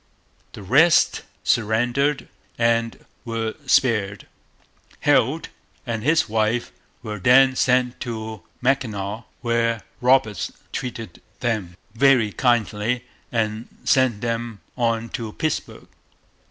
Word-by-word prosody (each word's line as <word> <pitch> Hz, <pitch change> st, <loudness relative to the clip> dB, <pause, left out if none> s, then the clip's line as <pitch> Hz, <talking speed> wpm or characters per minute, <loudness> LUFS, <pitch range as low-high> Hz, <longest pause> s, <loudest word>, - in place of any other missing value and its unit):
The -, -, -9 dB
rest 150 Hz, -, +4 dB, 0.2 s
surrendered 120 Hz, +6 st, +1 dB, 0.3 s
and 115 Hz, 0 st, 0 dB, 0.2 s
were 115 Hz, -2 st, -3 dB
spared. 110 Hz, -8 st, +2 dB, 0.8 s
Heald -, -, +2 dB, 0.4 s
and 115 Hz, -2 st, -3 dB
his 155 Hz, +6 st, +2 dB
wife 110 Hz, +2 st, 0 dB, 0.3 s
were 105 Hz, -2 st, -5 dB
then 130 Hz, +5 st, +5 dB
sent 125 Hz, -1 st, +2 dB
to 110 Hz, -3 st, -5 dB, 0.2 s
Mackinaw, 110 Hz, -5 st, -1 dB, 0.2 s
where 115 Hz, -1 st, 0 dB, 0.2 s
Roberts 125 Hz, -6 st, +2 dB, 0.2 s
treated 115 Hz, -7 st, -6 dB, 0.2 s
them 105 Hz, -8 st, -2 dB, 0.2 s
very 125 Hz, -3 st, +4 dB
kindly 120 Hz, 0 st, 0 dB, 0.3 s
and 110 Hz, -1 st, -1 dB, 0.2 s
sent 130 Hz, -5 st, +2 dB
them 115 Hz, -3 st, -3 dB
on 115 Hz, -2 st, 0 dB
to 115 Hz, -3 st, -5 dB
Pittsburg. 155 Hz, -1 st, -3 dB
115 Hz, 100 wpm, -22 LUFS, 110-125 Hz, 0.8 s, then